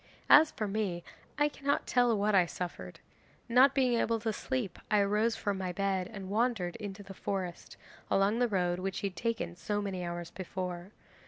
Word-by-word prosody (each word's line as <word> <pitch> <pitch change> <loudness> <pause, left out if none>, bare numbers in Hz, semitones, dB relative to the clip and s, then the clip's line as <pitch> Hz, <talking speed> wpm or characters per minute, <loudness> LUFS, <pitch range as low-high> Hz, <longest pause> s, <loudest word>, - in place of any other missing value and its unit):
As 305 +1 +9
for 215 - -3
me, 195 -4 -2 0.3
I 295 +1 +4
cannot 285 -1 -1
tell 245 -3 +3
what 205 +1 +1
I 185 -3 +5
suffered. 165 - -6 0.5
Not 255 +3 +5
being 255 -3 +3
able 230 0 +1
to 220 -1 -1
sleep 240 -6 -3
I 210 -2 +4
rose 210 +3 +1
from 200 -2 -2
my 185 -1 -2
bed 190 0 -1
and 195 -4 -7
wandered 215 -5 0
into 205 -1 -7
the 195 - -10
forest, 185 -3 -4 0.3
along 200 +4 +2
the 245 - +3
road 180 -4 0
which 190 +1 -3
he 200 - 0
had 185 - -19
taken 200 -3 -2
so 205 +3 -2
many 195 -3 -3
hours 175 -1 -5
before. 180 -1 -5
200 Hz, 185 wpm, -31 LUFS, 180-230 Hz, 0.5 s, As